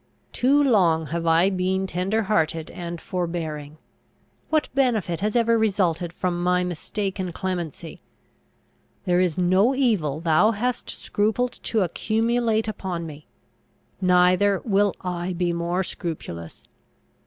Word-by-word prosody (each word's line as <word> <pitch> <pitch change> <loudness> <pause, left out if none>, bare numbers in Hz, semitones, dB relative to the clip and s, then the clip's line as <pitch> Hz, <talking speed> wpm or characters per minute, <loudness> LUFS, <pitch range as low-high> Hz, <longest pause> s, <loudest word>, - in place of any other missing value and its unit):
Too 280 +4 +3
long 175 - +3
have 170 0 -2
I 165 +4 +4
been 190 +1 0
tender 190 +4 -1
hearted 165 -5 0
and 170 -1 -6
forbearing! 160 -5 -4 0.7
What 310 -1 +2
benefit 225 -11 +1
has 210 +2 -1
ever 230 -1 +3
resulted 180 -6 +1
from 175 0 -2
my 180 0 +2
mistaken 185 +2 -3
clemency? 175 -4 -5 1.0
There 180 -1 +2
is 180 -4 +1
no 185 +8 +3
evil 200 - +1
thou 170 +7 +3
hast 245 +4 -2
scrupled 220 +4 -1
to 220 - +1
accumulate 225 +4 0
upon 185 -5 -4
me! 150 -1 -10 0.7
Neither 180 +2 +4
will 205 -2 +2
I 180 0 -3
be 175 0 0
more 170 +2 -1
scrupulous! 115 - -6
185 Hz, 120 wpm, -24 LUFS, 170-215 Hz, 1.0 s, I